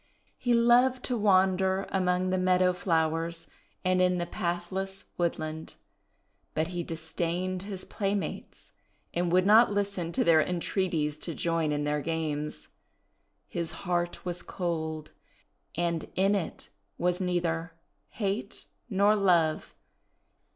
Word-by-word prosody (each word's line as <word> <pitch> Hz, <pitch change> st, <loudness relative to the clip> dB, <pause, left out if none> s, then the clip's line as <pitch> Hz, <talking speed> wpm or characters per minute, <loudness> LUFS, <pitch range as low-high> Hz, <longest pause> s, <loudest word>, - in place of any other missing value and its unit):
He 245 Hz, -1 st, +2 dB
loved 245 Hz, +2 st, +4 dB
to 250 Hz, -, -1 dB
wander 190 Hz, -2 st, +3 dB
among 185 Hz, -1 st, +1 dB
the 185 Hz, -, +1 dB
meadow 185 Hz, 0 st, +3 dB
flowers 165 Hz, -1 st, 0 dB, 0.4 s
and 185 Hz, 0 st, +3 dB
in 180 Hz, 0 st, +3 dB
the 175 Hz, -, -1 dB
pathless 185 Hz, +3 st, -3 dB
wood 175 Hz, -1 st, 0 dB
land. 155 Hz, 0 st, -6 dB, 0.8 s
But 160 Hz, +2 st, 0 dB
he 175 Hz, -1 st, -3 dB
disdained 170 Hz, +3 st, -3 dB
his 195 Hz, -1 st, -6 dB
playmates, 200 Hz, -1 st, -4 dB, 0.4 s
and 175 Hz, 0 st, 0 dB
would 185 Hz, +1 st, +4 dB
not 220 Hz, +2 st, +7 dB
listen 200 Hz, -4 st, -1 dB
to -, -, +2 dB
their 165 Hz, -2 st, +5 dB
entreaties 170 Hz, -3 st, -1 dB
to 165 Hz, -1 st, -5 dB
join 165 Hz, -2 st, 0 dB
in 145 Hz, 0 st, -1 dB
their 150 Hz, 0 st, 0 dB
games. 150 Hz, -, -3 dB, 0.8 s
His 170 Hz, -1 st, -3 dB
heart 175 Hz, -1 st, -1 dB
was 180 Hz, 0 st, -2 dB
cold, 160 Hz, -4 st, -3 dB, 0.6 s
and 170 Hz, -1 st, -1 dB
in 195 Hz, +2 st, +3 dB
it 195 Hz, -5 st, -3 dB, 0.3 s
was 180 Hz, +1 st, 0 dB
neither 170 Hz, -2 st, -1 dB, 0.4 s
hate 200 Hz, 0 st, -3 dB, 0.2 s
nor 205 Hz, +1 st, +4 dB
love. 170 Hz, -6 st, +2 dB
180 Hz, 125 wpm, -29 LUFS, 165-190 Hz, 0.8 s, not